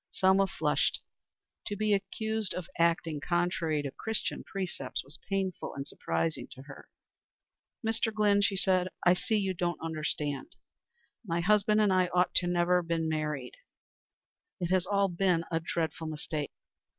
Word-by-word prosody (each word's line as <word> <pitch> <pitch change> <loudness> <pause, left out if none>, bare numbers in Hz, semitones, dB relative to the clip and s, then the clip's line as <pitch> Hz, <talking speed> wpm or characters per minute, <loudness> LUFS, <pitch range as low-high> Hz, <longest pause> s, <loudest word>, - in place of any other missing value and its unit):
Selma 190 +1 +4
flushed. - - +1 0.7
To 205 - -2
be 210 0 +2
accused 215 +2 -1
of 180 - -4
acting 165 -2 +2
contrary 170 -1 0
to 140 - -3
Christian 220 +9 -2
precepts 180 -9 -4
was 140 +3 -6
painful 195 -2 -2
and 140 0 -5
surprising 80 0 -2
to 130 - -11
her. 135 -1 -12 1.0
"Mr. 225 0 +1
Glynn," 210 -1 +3
she 200 -1 +2
said, 185 -1 +2 0.2
"I 175 - +7
see 215 +4 0
you 195 -2 0
don't 175 -1 -1
understand. 155 - -3 0.7
My 170 -5 -1
husband 210 +3 +4
and 205 -3 +4
I 185 -1 +4
ought 180 0 +4
never 175 0 +2
to 170 -1 -2
have 165 - 0
married. 155 - -2 1.0
It 175 -1 -2
has 185 -1 +2
all 200 0 +3
been 175 -2 +1
a 165 - +2
dreadful 165 0 -2
mistake. 150 -1 -3
180 Hz, 150 wpm, -30 LUFS, 160-195 Hz, 1.0 s, I